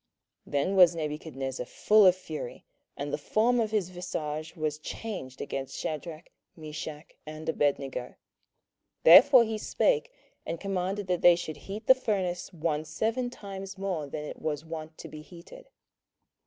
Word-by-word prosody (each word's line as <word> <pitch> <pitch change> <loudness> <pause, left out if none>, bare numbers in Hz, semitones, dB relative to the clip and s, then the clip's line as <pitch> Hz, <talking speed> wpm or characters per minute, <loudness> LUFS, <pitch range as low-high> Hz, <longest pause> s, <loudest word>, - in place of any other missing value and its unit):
27:003:019 - - -14
Then 145 +8 +1
was 180 -2 +7
Nebuchadnezzar 150 -5 -4
full 210 -2 +5
of 180 - +6
fury, 155 -8 -7 0.3
and 145 0 -4
the - - -1
form 230 +10 +2
of 220 -2 +1
his 210 -5 0
visage 155 -3 -5
was 155 -2 -2
changed 155 - -6
against 135 -1 -5
Shadrach, 155 +1 -5 0.3
Meshach, 155 0 -7 0.2
and 155 +1 -8
Abednego: 140 -5 -1 0.9
therefore 250 - +9
he 220 -1 -3
spake, - - +1 0.3
and 165 0 -4
commanded 195 +1 -2
that 180 -1 -1
they 175 -1 +8
should 160 -3 -5
heat 200 +8 -8
the 260 - +9
furnace 190 -9 -2
one 155 -3 -1
seven 220 +11 -1
times 195 -3 -8
more 185 -6 -3
than 150 +2 -5
it - - -8
was 155 0 -3
wont 160 -1 -7
to - - -8
be 155 - -9
heated. 175 - -13
170 Hz, 155 wpm, -29 LUFS, 150-195 Hz, 0.9 s, therefore